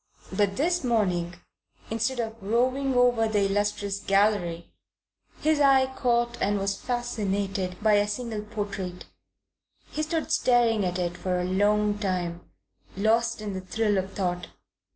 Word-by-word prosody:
But 200 -2 +1
this 345 +4 +1
morning, 180 -8 0 0.6
instead 230 +3 -1
of 225 -1 -4
roving 255 +6 +1
over 245 -2 +4
the 205 -2 +1
illustrious 205 0 -1
gallery, 195 -5 +1 0.7
his 310 -1 +2
eye 265 -2 +4
caught 240 -1 0
and 205 +1 +2
was 200 0 -1
fascinated 200 -7 -2
by 215 -1 +5
a 205 0 +3
single 220 0 -3
portrait. 200 -4 -5 0.9
He 305 - -2
stood 320 0 -2
staring 240 -7 +3
at 180 0 -1
it 175 -1 -2
for 180 0 -1
a - - -1
long 205 +2 +2
time, 180 -4 -2 0.6
lost 225 +2 +2
in 210 -2 -4
the 190 - -4
thrill 205 +1 0
of 190 +1 -5
thought. 180 -2 -2
210 Hz, 140 wpm, -26 LUFS, 195-240 Hz, 0.9 s, by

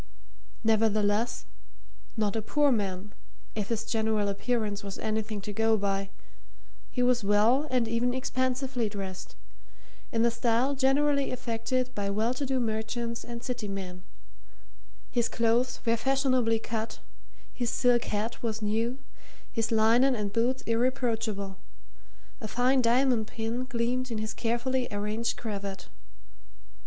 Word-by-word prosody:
Nevertheless, 220 +1 +2 0.7
not 210 -2 +1
a 225 - 0
poor 290 +6 +3
man, 200 -3 -2 0.4
if 205 -2 -2
his 225 -1 -1
general 220 -3 +1
appearance 210 -1 -1
was 200 -1 -6
anything 215 -1 -2
to 205 +2 -5
go 225 +1 +3
by 195 -1 -1 0.8
he 250 - 0
was 245 -2 +3
well 220 +8 +4
and 250 -3 +2
even 230 +2 +1
expensively 255 -1 -1
dressed, 195 -3 -6 0.8
in 230 0 +2
the 235 - +4
style 235 +3 +2
generally 280 +1 +2
affected 255 +1 -2
by 205 -3 -2
well 220 +4 +1
to 275 +2 -3
do 265 0 +1
merchants 230 +1 -2
and 235 0 -7
city 245 -4 -3
men; 185 -2 -5 1.1
his 240 -2 +1
clothes 235 +2 +1
were 230 0 +4
fashionably 255 -2 +2
cut, 225 0 -4 0.6
his 240 -2 -1
silk 245 -1 +3
hat 215 +3 -2
was 220 -2 -2
new, 225 +4 0 0.5
his 225 0 -1
linen 230 +4 +4
and 205 -3 -3
boots 245 +3 +1
irreproachable; 225 -5 0 0.8
a 220 - -5
fine 255 +4 +3
diamond 240 -1 +3
pin 230 +3 -3
gleamed 255 +1 -1
in 230 - -2
his 215 +1 -3
carefully 245 +2 0
arranged 210 +3 -1
cravat. 200 -3 -5
230 Hz, 130 wpm, -29 LUFS, 215-250 Hz, 1.1 s, well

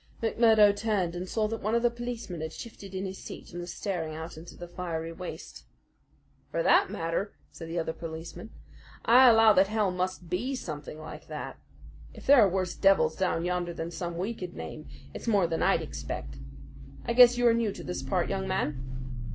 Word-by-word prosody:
McMurdo 220 -2 +5
turned 205 -5 0
and 180 +1 -5
saw 215 -1 +1
that 225 +1 -4
one 215 +3 0
of 235 - +1
the 240 - +4
policemen 235 -8 -5
had 160 0 -4
shifted 200 -4 -9
in 190 +1 -2
his 190 0 -6
seat - - -9
and 175 0 -6
was 175 0 -6
staring 165 -6 -3
out 160 +1 -7
into 160 +2 -11
the 175 - -8
fiery 165 -2 -4
waste. 180 +1 -8 0.9
"For - - -1
that - - +5
matter," 165 +5 -2 0.2
said 165 - -9
the 165 +1 -4
other 160 -1 -1
policeman, 165 +6 -7 0.6
"I 250 +2 +8
allow 225 -1 +7
that 190 0 +5
hell 210 -2 +1
must 180 -1 -3
BE 245 +11 -1
something 150 - -6
like 155 0 -9
that. - - -6 0.6
If - - -11
there 280 -3 +8
are 200 - +6
worse 185 -1 -1
devils 190 -5 +4
down 180 -3 0
yonder 175 -1 -1
than 165 +1 -4
some 175 -1 -4
we 195 +6 -2
could 180 -5 -7
name, 80 -3 -7 0.3
it's - - -8
more 205 -5 +4
than 165 -1 -1
I'd - - +3
expect. 70 0 -6 0.7
I 235 - 0
guess 245 0 +8
you 245 - +2
are 235 - +6
new 230 -2 +1
to - - -9
this 180 - -4
part, 180 -3 0
young 190 -1 -2
man?" 150 -8 -1
185 Hz, 200 wpm, -29 LUFS, 170-220 Hz, 0.9 s, I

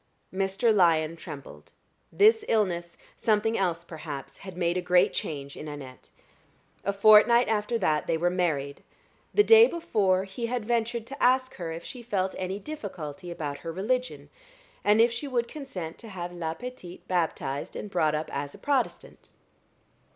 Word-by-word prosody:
Mr. 195 +4 +1
Lyon 165 -4 +3
trembled. 150 -4 -11 0.4
This 435 +2 +5
illness 175 -6 0 0.2
something 225 +1 +1
else, 170 -4 0
perhaps 150 -5 -8
had 190 -3 -10
made 175 -1 +1
a 180 - 0
great 180 0 +3
change 140 -2 -4
in 155 - -8
Annette. 140 -3 -9 0.7
A 200 - +1
fortnight 215 +4 +6
after 220 +2 0
that 155 -8 0
they 165 - +1
were 175 +2 +1
married. 150 -6 -1 0.5
The 415 - +5
day 450 +2 +8
before 200 - +1
he 195 +5 -5
had 240 -2 -2
ventured 235 0 -1
to 275 +3 -9
ask 255 +1 +3
her 170 -3 -4
if 165 +1 -6
she 250 - -8
felt 195 -5 -1
any 185 +1 -3
difficulty 190 - -7
about 150 -4 -5
her 165 - -6
religion, 250 +9 -2 0.5
and 210 +1 +4
if 230 +1 +5
she 285 +5 -4
would 240 -3 0
consent 195 - -7
to 225 - -10
have 175 -3 -6
la 165 -2 -3
petite 245 -7 -9
baptized 160 -6 -2
and - - -5
brought 160 -6 +1
up 155 +1 -3
as 140 0 -4
a - - -12
Protestant. 280 -3 -2
190 Hz, 165 wpm, -27 LUFS, 165-235 Hz, 0.7 s, day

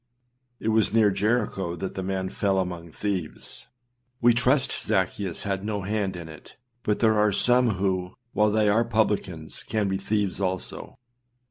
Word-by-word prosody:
It 110 - -1
was 110 -1 +3
near 110 -3 +5
Jericho 105 -4 0
that 95 +2 -4
the 95 - -4
man 95 0 -2
fell 100 -2 +1
among 90 -3 -3
thieves; 95 -4 -4 0.5
we 120 0 +5
trust 130 +3 +3
Zaccheus 95 -2 -1
had 95 -1 -2
no 105 -2 -2
hand 100 -1 -1
in 85 -2 -7
it; 80 -1 -13 0.3
but 105 -2 -1
there 110 -2 +4
are 105 0 +4
some 125 +1 +3
who, 95 -1 -1 0.2
while 105 0 +3
they 105 0 +2
are 110 +3 +4
publicans, 105 -8 -1
can 105 -1 -1
be 95 0 0
thieves 100 -1 -1
also. 95 -1 -3
100 Hz, 160 wpm, -26 LUFS, 95-110 Hz, 0.5 s, near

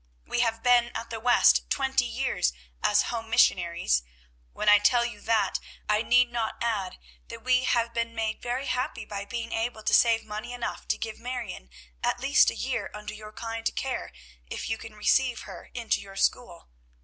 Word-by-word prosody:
We - - -2
have 225 -1 +1
been 245 -1 +5
at 230 +1 -7
the 225 - -4
West 245 +2 +4
twenty 265 -2 +1
years 250 - 0 0.3
as 210 0 +4
Home 225 -1 -4
Missionaries. 170 - +3 0.5
When 210 - -5
I 210 0 +8
tell 235 +4 +3
you 220 -4 -6
that, 225 -1 +1 0.3
I 210 0 +2
need 245 +1 +4
not 230 -2 -2
add 215 -6 -2 0.3
that - - -9
we 255 0 +3
have 235 -1 +1
been 230 0 -2
made 220 -1 -2
very 245 +3 -2
happy 250 -4 -2
by 200 -1 -5
being 230 +2 -5
able 225 -1 -2
to - - 0
save 230 -1 +5
money 215 +3 -6
enough 245 -1 -5
to - - +1
give 220 -1 -5
Marion 235 - -6 0.3
at - - +1
least - - +5
a - - -5
year - - -2
under 210 0 -7
your 215 0 -10
kind 225 +1 -3
care, 265 -1 -3 0.4
if - - -5
you 225 - 0
can 225 -2 -10
receive 250 +3 +2
her - - -10
into 235 -2 0
your 195 -1 -12
school. 185 - -1
230 Hz, 185 wpm, -27 LUFS, 210-245 Hz, 0.5 s, I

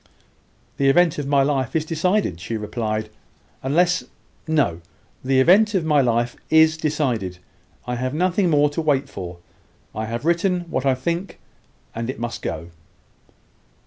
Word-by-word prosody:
"The 135 -1 +3
event 165 +2 +3
of 145 - -3
my 140 -1 +3
life 135 -2 -1
is 155 -1 +1
decided," 165 - 0
she 110 +6 -4
replied, 110 0 -3 0.5
"unless 175 +7 +2 0.4
No 145 - +1 0.4
the 130 0 +2
event 205 +9 +5
of 175 -4 +1
my 150 -2 +4
life 120 -1 0
is 160 0 +5
decided. 130 - -1 0.5
I 125 0 -3
have 130 +1 -2
nothing 180 +2 +1
more 145 -2 +3
to 165 - -2
wait 140 -3 +1
for. 90 -2 -7 0.6
I 110 0 -4
have 115 +5 -4
written 175 +2 +1
what 130 +1 -1
I 130 - +3
think, 170 +9 -3 0.5
and 115 +1 -4
it 130 - -5
must 120 -1 -4
go." 85 +2 -5
140 Hz, 150 wpm, -22 LUFS, 120-165 Hz, 0.6 s, event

